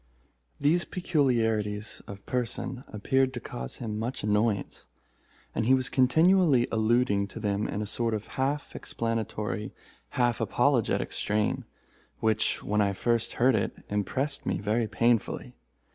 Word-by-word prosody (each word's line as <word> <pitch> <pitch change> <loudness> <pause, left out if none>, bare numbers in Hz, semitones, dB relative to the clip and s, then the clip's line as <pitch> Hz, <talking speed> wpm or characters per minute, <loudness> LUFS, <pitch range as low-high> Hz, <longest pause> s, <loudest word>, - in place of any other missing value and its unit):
These 165 +5 +3
peculiarities 115 - 0
of 100 -1 -9
person 125 +1 -2
appeared 130 +5 0
to - - -3
cause 60 - -6
him 110 -3 -4
much 120 +4 -3
annoyance, 105 0 0 0.7
and 110 - -1
he 130 - +6
was 130 0 0
continually 150 0 +4
alluding 110 -2 +2
to 105 - -9
them 105 -1 -1
in 105 - -3
a - - -4
sort 115 +2 -1
of 105 - -5
half 140 +2 -2
explanatory, 110 -2 -3 0.4
half 120 -2 +2
apologetic - - +1
strain, 105 0 0 0.5
which, 110 -1 +1
when 105 +1 +1
I 100 -1 +2
first 115 +3 0
heard 130 +2 +3
it, 105 -3 0 0.2
impressed 130 +8 -1
me - - -1
very 110 +3 0
painfully. 115 +1 0
115 Hz, 135 wpm, -28 LUFS, 105-130 Hz, 0.7 s, he